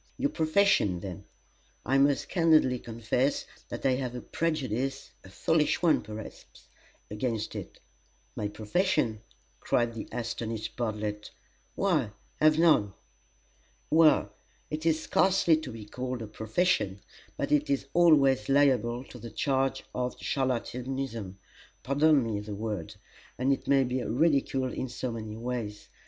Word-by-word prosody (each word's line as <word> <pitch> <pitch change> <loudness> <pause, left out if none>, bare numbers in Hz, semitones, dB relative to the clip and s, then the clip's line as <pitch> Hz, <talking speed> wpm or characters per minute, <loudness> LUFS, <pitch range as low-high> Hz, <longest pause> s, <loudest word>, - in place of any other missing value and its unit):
"Your 280 +2 0
profession, 160 - +2
then. 90 -3 -7 0.6
I 135 +1 +3
must 140 0 +3
candidly 155 -8 +3
confess 115 +4 -1 0.2
that - - -6
I 135 - +4
have 125 -2 -4
a 125 - -5
prejudice 135 -6 -2
a 95 - -13
foolish 160 - +1
one, 165 -3 +4
perhaps, 110 0 -10 0.4
against 110 0 -2
it." - - -8 0.6
"My 105 - -2
profession!" 110 - 0 0.4
cried 120 -1 +1
the 115 - -6
astonished 115 -2 -4
Bartlett; 105 -2 -3 0.5
"why, - - +1 0.3
I - - +2
have 155 0 +6
none!" 150 - +4 1.0
"Well 160 -1 +5 0.4
it 155 +2 -2
is 160 -1 +3
scarcely 190 -4 +3
to 155 -5 -6
be 110 -2 -9
called 125 +2 -4
a - - -7
'profession,' 110 - 0 0.4
but - - -2
it 150 0 +2
is 140 -1 0
always 140 -9 +4
liable 130 -4 +3
to 125 - -12
the 115 +1 -8
charge 135 +3 0
of 125 0 -2
charlatanism: 125 -5 -3 0.5
pardon 145 +1 +4
me 110 -3 -2
the 105 0 -6
word. 105 -5 -4 0.4
And 130 +2 +2
it - - -5
may 135 -1 +4
be 125 0 -2
ridiculed 135 -2 +1
in 130 - -3
so 125 +1 -4
many 110 -1 -6
ways. 115 -3 -5
125 Hz, 140 wpm, -29 LUFS, 110-145 Hz, 1.0 s, have